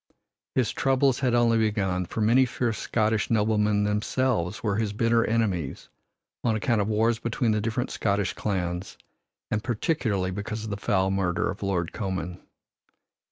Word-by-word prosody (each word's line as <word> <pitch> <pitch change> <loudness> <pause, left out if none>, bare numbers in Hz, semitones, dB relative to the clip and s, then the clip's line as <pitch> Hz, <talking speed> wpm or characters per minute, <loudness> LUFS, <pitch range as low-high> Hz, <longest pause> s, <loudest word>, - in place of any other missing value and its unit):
His 125 -4 +2
troubles 135 -1 +2
had 125 -3 +2
only 115 -1 +4
begun, 95 -5 0
for 110 - -4
many 125 +5 +4
fierce 115 -2 -2
Scottish 110 -1 0
noblemen 105 -1 +2
themselves 105 -1 0
were 105 -3 0
his 110 -2 -1
bitter 115 +1 +2
enemies 100 -10 -1 0.5
on 115 -2 +2
account 110 0 +1
of 100 - -1
wars 110 +1 +2
between 115 0 0
the 105 -1 +1
different 115 +3 -2
Scottish 100 -2 0
clans, 90 -2 -3 0.5
and 105 0 0
particularly 110 - 0
because 105 +3 -4
of 110 - -5
the - - -1
foul 95 -2 +1
murder 95 -2 0
of 100 - -9
Lord 90 -4 -1
Comyn. 95 -4 -4
110 Hz, 155 wpm, -26 LUFS, 100-115 Hz, 0.5 s, only